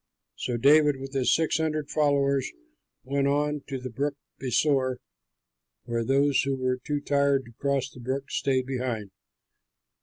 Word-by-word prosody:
So 120 - -2
David 145 +3 +5
with 135 +1 -8
his 135 -2 +2
six 160 0 +2
hundred 155 -2 -1
followers 140 -3 +2 0.5
went 140 +1 0
on 150 +1 0
to 135 - -3
the 130 -1 -7
Brook 140 +5 -2 0.3
Besor, 130 0 +2 0.9
where 115 -1 -2
those 135 +2 +3
who 135 0 -1
were 130 -1 -1
too 145 -1 -1
tired 140 -1 +2
to 115 - -14
cross 140 -2 0
the - - -13
brook 130 +3 -4
stayed 130 -2 +1
behind. 125 -6 -3
135 Hz, 150 wpm, -27 LUFS, 130-145 Hz, 0.9 s, David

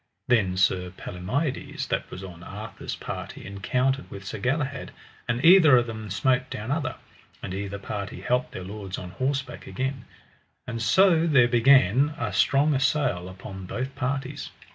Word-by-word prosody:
Then 100 -7 +2
Sir 90 -1 +2
Palomides 130 - -3
that - - -2
was 95 - -8
on 90 -3 -9
Arthur's - - -7
party - - -7
encountered 125 +8 -1
with 100 0 -9
Sir - - -5
Galahad, 140 +1 -1 0.4
and 120 +5 0
either 165 -6 +8
of 120 - +2
them 110 -2 -6
smote 130 +6 +1
down 110 +5 -5
other, 145 -3 -1 0.5
and - - -4
either 100 +1 -4
party 100 0 -5
halp 125 +1 0
their 95 - -7
lords 100 0 -6
on 90 -1 -7
horseback 130 +5 -3
again. 135 0 -3 0.7
So 170 - +4
there 135 -6 +5
began 130 +3 +5
a 110 -5 -3
strong 140 +8 +3
assail 130 - +1
upon 95 0 -9
both 130 +7 -4
parties. 135 +2 -3
125 Hz, 150 wpm, -26 LUFS, 100-135 Hz, 0.7 s, either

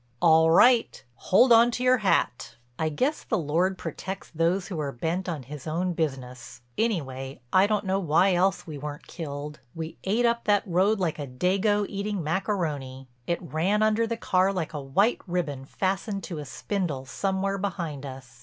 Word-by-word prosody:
"All 160 -1 +5
right—hold 215 - +4
on 230 +1 +7
to 245 +1 -3
your 255 0 +4
hat." 125 - 0 0.2
I 160 - +1
guess 260 - -1
the 220 - -1
Lord 175 +4 0
protects 190 +1 -6
those 170 +3 0
who 175 -5 -4
are 145 -2 -2
bent 165 +9 -2
on 155 -6 -4
His 145 +3 -9
own 175 +3 -1
business. 125 -7 -4
Anyway 135 - -2
I 190 +2 +6
don't 210 -1 0
know 190 +1 +1
why 180 +2 +3
else 185 +2 +1
we 150 -3 -7
weren't 150 +2 -7
killed. 150 -2 -6 0.2
We 160 0 -6
ate 220 +5 +1
up 235 0 +1
that 205 -1 +3
road 195 +4 +2
like 165 -4 -1
a 145 - -4
dago 195 - +1
eating 200 -2 -3
macaroni; 150 -7 -2 0.2
it 170 +1 -1
ran 180 +6 +1
under 215 +1 +2
the 230 0 -3
car 185 -2 +2
like 175 -6 -3
a 150 - -4
white 195 - +1
ribbon 160 -7 -2
fastened 195 - -2
to 165 -4 -5
a 150 - -6
spindle 145 0 -3
somewhere 195 +7 -1
behind 175 -8 -4
us. 130 -3 -10
175 Hz, 175 wpm, -26 LUFS, 150-200 Hz, 0.2 s, on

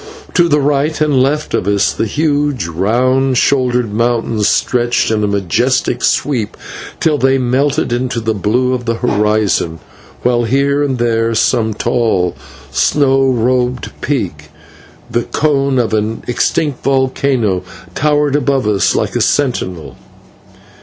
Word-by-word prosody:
To 175 -2 +3
the 150 -1 +3
right 145 +2 0
and 150 -4 +2
left 150 +3 -1
of 90 - -1
us 100 -1 +2
the 110 - -2
huge, 145 - 0
round 125 +10 +1
shouldered 125 -5 +1
mountains 115 -2 0
stretched 120 -2 +1
in 105 -1 0
a - - +1
majestic 115 +6 0
sweep 120 -8 0 0.4
till 150 -3 +1
they 135 +1 +3
melted 130 0 0
into 125 0 -1
the 110 0 -1
blue 120 +5 0
of 125 -1 -3
the 115 0 0
horizon, 105 -7 0 0.5
while 120 -1 +2
here 140 +4 +1
and 135 -3 0
there 115 -1 0
some 110 -1 +1
tall, 110 -6 0 0.4
snow 135 -2 +2
robed 125 +1 0
peak, 90 - -3 0.6
the 120 - +1
cone 140 0 0
of 115 -3 0
an 110 +1 -1
extinct 145 +3 -1
volcano, 130 -6 +1 0.3
towered 150 -1 +1
above 140 -3 +1
us 95 -3 +1
like - - -1
a - - +1
sentinel. 95 - -1
125 Hz, 135 wpm, -15 LUFS, 110-135 Hz, 0.6 s, To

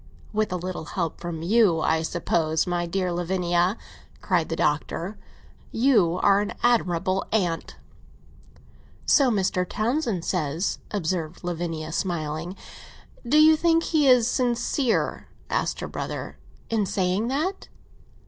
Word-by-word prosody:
"With 215 -1 0
a - - -1
little 180 -2 -5
help 170 -1 -3
from 170 -2 -5
you, 200 -3 +4
I 160 +1 +2
suppose. 160 -1 0
My 175 -1 -1
dear 180 +1 -1
Lavinia," 175 +2 0 0.4
cried 175 -5 0
the 165 - -1
Doctor, 165 +6 -1 0.6
"you 215 -9 +3
are 200 0 +5
an 205 - -3
admirable 190 -5 +2
aunt!" 180 -6 -1 1.3
"So 275 -4 +5
Mr. 190 -4 +1
Townsend 220 - -1
says," 160 0 -1
observed 170 -4 -3
Lavinia, 165 -2 -3
smiling. 170 0 -3 0.7
"Do 290 +5 +4
you 315 +1 +7
think 330 +1 +2
he 305 -4 +2
is 250 -3 +6
sincere?" 245 0 0 0.2
asked - - -1
her - - -3
brother. - - -6 0.3
"In 215 -3 +1
saying 190 +3 0
that?" 310 +10 -2
185 Hz, 125 wpm, -25 LUFS, 170-225 Hz, 1.3 s, you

